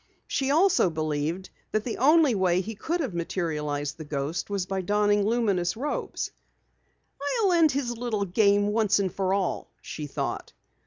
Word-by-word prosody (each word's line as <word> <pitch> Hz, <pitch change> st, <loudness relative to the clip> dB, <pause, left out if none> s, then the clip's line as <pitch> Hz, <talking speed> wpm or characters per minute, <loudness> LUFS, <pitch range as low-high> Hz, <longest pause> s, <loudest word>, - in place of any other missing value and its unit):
She 270 Hz, -1 st, -1 dB
also 325 Hz, -, +4 dB
believed 155 Hz, +3 st, -2 dB, 0.2 s
that 215 Hz, -, +1 dB
the 235 Hz, -, -4 dB
only 300 Hz, +1 st, +5 dB
way 185 Hz, -3 st, +2 dB
he 225 Hz, +4 st, -6 dB
could 330 Hz, -, -2 dB
have 265 Hz, -, -3 dB
materialized 150 Hz, -4 st, -3 dB
the -, -, -5 dB
ghost 150 Hz, +4 st, -3 dB
was 200 Hz, -3 st, -1 dB
by 190 Hz, 0 st, -2 dB
donning 205 Hz, +2 st, +2 dB
luminous 205 Hz, -6 st, +1 dB
robes. 290 Hz, +4 st, -3 dB, 1.1 s
"I'll 390 Hz, -, +4 dB
end 330 Hz, -3 st, +5 dB
his 250 Hz, -3 st, -2 dB
little 225 Hz, -4 st, -2 dB
game 205 Hz, +2 st, +3 dB
once 210 Hz, -1 st, +2 dB
and 190 Hz, -3 st, -1 dB
for 190 Hz, -1 st, -1 dB
all," 195 Hz, -2 st, -1 dB
she 150 Hz, -2 st, -6 dB
thought. 140 Hz, -, -4 dB
200 Hz, 160 wpm, -26 LUFS, 175-240 Hz, 1.1 s, only